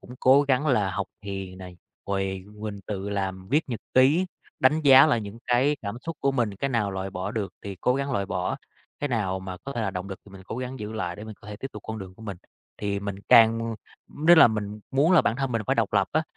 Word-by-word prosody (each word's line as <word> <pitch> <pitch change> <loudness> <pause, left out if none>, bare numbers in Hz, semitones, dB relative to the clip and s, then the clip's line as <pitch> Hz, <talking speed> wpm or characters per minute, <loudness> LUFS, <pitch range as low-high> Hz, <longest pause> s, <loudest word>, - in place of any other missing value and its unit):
cũng 125 - -11
cố 135 +2 +6
gắng 140 +1 +1
là 110 -9 +2
học 95 +2 -3 0.2
thiền 95 -2 -6
này, 90 -1 -10 0.3
rồi 95 -1 -2
mình 105 -1 -6
tự 100 -1 -4
làm 95 -2 -3
viết 150 +4 +1
nhật 120 -3 -4
ký, 145 +8 +5 0.3
đánh 150 +4 +4
giá 135 -1 +8
lại 140 -7 +2
những 105 +1 -8
cái 130 +5 +3
cảm 100 +1 -4
xúc 165 - -4
của 140 0 +2
mình, 120 -6 0
cái 140 - -1
nào 110 -5 0
loại 95 0 -4
bỏ 95 +1 -4
được 105 -5 -3
thì 100 -1 -6
cố 125 - +2
gắng 140 0 -2
loại 100 -5 0
bỏ, 90 -1 -2 0.4
cái 145 - -1
nào 95 -7 -1
mà 95 -1 -6
có 140 - -5
thể 120 - -3
là 105 - -1
động 95 0 -5
lực 95 - -6
thì 100 - -16
mình 95 -1 -11
cố 110 - -5
gắng 130 +1 -5
giữ 105 +1 -5
lại 90 -6 -3
để 105 - -8
mình 110 - -8
có 105 - -13
thể 105 - -6
tiếp 135 - -6
tục 105 - -9
con 110 0 -5
đường 95 -2 -9
của 110 - -15
mình, 100 -4 -5 0.4
thì 100 -1 -2
mình 100 -1 -4
càng 115 0 +5 0.3
nếu 165 +4 +5
là 160 - +9
mình 105 -1 -4
muốn 145 +7 +3
là 175 - +6
bản 115 - 0
thân 135 -2 -2
mình 115 -2 0
phải - - +2
độc 115 -3 +1
lập 100 -2 +2
á, 155 +1 +2
110 Hz, 265 wpm, -26 LUFS, 95-130 Hz, 0.4 s, là